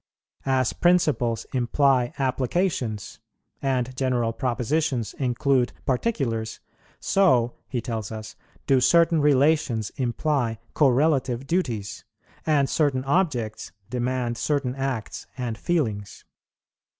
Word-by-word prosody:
As 130 -2 +2
principles 155 -10 +2
imply 130 0 +2
applications, 130 - -1 0.4
and 130 -2 -1
general 125 -3 0
propositions 130 0 -1
include 130 0 +1
particulars, 120 - -1 0.4
so, 130 -12 +3
he 125 -3 -3
tells 110 -2 -4
us, 110 -1 -7 0.3
do 135 -2 +3
certain 170 +2 +4
relations 140 -5 +2
imply 125 -2 0 0.2
correlative 135 -2 +2
duties, 125 - -2 0.4
and 145 -3 +3
certain 140 -4 +1
objects 135 - -1 0.2
demand 125 -1 -1
certain 140 -4 0
acts 135 -4 -4
and 120 -3 -3
feelings. 110 - -2
130 Hz, 95 wpm, -25 LUFS, 120-145 Hz, 0.4 s, certain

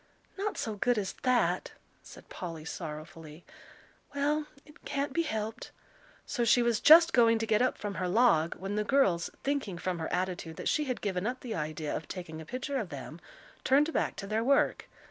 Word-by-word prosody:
"Not 400 +1 -3
so 220 -2 -3
good 245 +3 +2
as 195 -2 -2
that," 255 -2 +1 0.3
said - - -14
Polly, 165 -3 -7
sorrowfully. 155 +1 -8 0.7
"Well, 295 +2 0 0.2
it 300 - -19
can't 280 0 -2
be 335 - +2
helped." 220 -8 -4 0.6
So 240 - -1
she 240 +1 +4
was 235 -2 +1
just 335 +2 +8
going 230 -2 +5
to 225 - -2
get 215 0 +2
up 255 - +1
from 205 -1 -4
her 180 - 0
log, 180 -5 +3
when 195 +3 -4
the 210 - +1
girls, 200 -10 +2
thinking 270 -10 -2
from 180 0 -3
her 160 - -4
attitude 180 -3 -2
that - - -2
she 300 - +1
had 255 -3 -3
given 190 -1 -1
up 255 +1 -3
the 240 -3 -5
idea 155 -3 -3
of 155 - -5
taking 165 -4 -7
a - - -10
picture 270 - -3
of 210 -7 -4
them, - - -8 0.4
turned 295 +4 +3
back - - 0
to 200 - -6
their 215 +3 -1
work. 275 +3 +2
220 Hz, 195 wpm, -30 LUFS, 180-265 Hz, 0.7 s, just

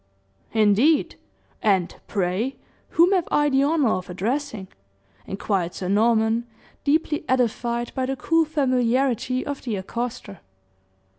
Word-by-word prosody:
"Indeed! 225 +8 +3 0.5
And, 190 -5 +1
pray, 200 +7 -1 0.3
whom 345 +3 +4
have 370 -4 +2
I 295 0 +3
the 270 -1 +3
honor 290 -3 +2
of 185 +1 -3
addressing?" 220 +2 -3 0.6
inquired 190 -3 -2
Sir 185 - -4
Norman, 225 +2 +2 0.4
deeply 300 +1 +1
edified 240 -1 0
by 260 -1 -1
the 270 - -1
cool 330 +5 +2
familiarity 255 -3 +1
of 285 -1 -4
the 230 -5 -3
accoster. 225 +1 -5
240 Hz, 120 wpm, -23 LUFS, 205-280 Hz, 0.6 s, whom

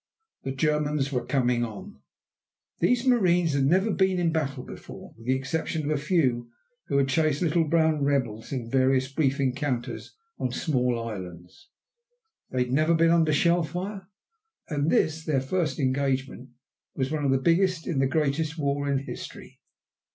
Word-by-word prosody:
The 135 - -4
Germans 150 0 0
were 125 -3 -1
coming 125 -4 +1
on. 190 - -7 0.8
These 245 0 +2
marines 180 - +3
had 140 -1 +2
never 190 +9 +3
been 190 -1 +2
in 175 -2 +2
a - - -1
battle 140 -5 -2
before, - - -11
with 115 +1 -14
the 130 - +3
exception 155 +4 -2
of 150 - -1
a 140 - -3
few 130 -8 +1 0.4
who - - 0
had 140 -1 +3
chased 155 +2 +1
little 165 0 +2
brown 160 -2 +2
rebels 125 -6 -1
in 125 -4 -3
various 130 +1 +2
brief 140 -2 +1
encounters 130 -2 -2 0.2
on 125 - -1
small 125 -5 0
islands. 95 - -8 0.8
They 125 -1 +1
had 125 - -7
never 155 +5 +3
been 165 0 +4
under 165 -2 +3
shell 170 +4 +3
fire. 190 +5 -5 0.6
And 145 -1 0
this 160 0 +1
their 150 -4 +1
first 155 +4 -1
engagement 135 -2 -1 0.5
was 130 +1 -1
one 155 -2 -1
of 140 - +1
the 135 - +4
biggest 170 +4 +2
in 155 -6 -1
the 135 - +3
greatest 155 +2 0
war 145 -1 -1
in 140 - +2
history. - - -9
145 Hz, 165 wpm, -26 LUFS, 130-165 Hz, 0.8 s, been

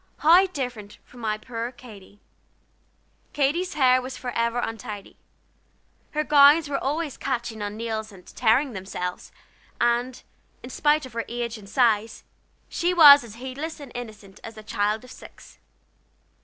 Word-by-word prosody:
How 350 +5 +5
different 245 - -6
from 245 - -17
my 215 -2 -2
poor 230 +1 -6
Katy! 205 -5 -15 1.1
Katy's 315 +7 0
hair 255 -2 +4
was 255 +1 -7
forever 235 -1 -2
in 235 -2 -2
a - - -18
snarl; 205 0 -8 1.0
her 305 0 0
gowns 295 +1 +6
were 285 - -3
always 295 +1 -2
catching 240 -4 -4
on 205 +1 -5
nails 220 -1 -4
and 185 -3 -16
tearing 245 +3 +1
"themselves"; 185 -2 -6 0.5
and, 240 +1 0 0.4
in 250 - -9
spite 295 +1 +1
of 255 - -12
her 230 0 -3
age 235 -1 -4
and 200 -1 -14
size, 225 -2 +1 0.4
she 355 +1 -1
was 290 -4 +9
as 225 -2 -11
heedless 265 +7 -6
and 280 -4 -11
innocent 215 -5 -9
as 225 -1 -10
a 215 - -10
child 210 +1 -1
of 255 - -13
six. - - -15
240 Hz, 155 wpm, -24 LUFS, 220-280 Hz, 1.1 s, was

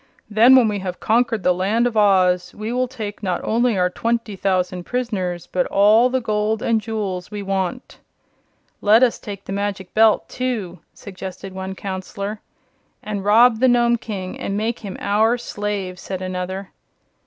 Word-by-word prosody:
Then, 230 +5 +7
when 250 -3 +6
we 205 -1 -1
have 185 -1 -5
conquered 225 -2 +1
the 180 - +4
Land 200 +6 +1
of 240 -2 -1
Oz, 185 -4 +3
we 215 +3 -4
will 255 +1 0
take 220 -6 -7
not 185 -4 -1
only 235 -1 +1
our 180 0 +2
twenty 230 0 -2
thousand 185 -2 -1
prisoners 190 -8 -3
but 180 -1 -1
all 215 +5 +5
the 260 +1 0
gold 215 -1 -1
and 225 -2 +1
jewels 205 -5 -4
we 205 -1 -6
want." 195 +5 -3 0.8
"Let 220 +4 +5
us 245 - +2
take 200 -2 -8
the 195 - -5
Magic 200 -2 -3
Belt, 220 0 +4
too," 225 -9 -3 0.2
suggested 190 -1 -8
one 190 0 -5
counselor. 200 +2 -5 0.6
"And 205 -2 -4
rob 225 +3 +5
the 260 - +4
Nome 240 -1 +3
King 195 -5 -6
and 195 - -3
make 225 +2 -2
him 200 -4 -7
our 220 +4 +2
slave," 205 -5 -4
said 190 0 -5
another. 185 +1 -4
205 Hz, 165 wpm, -21 LUFS, 190-230 Hz, 0.8 s, Then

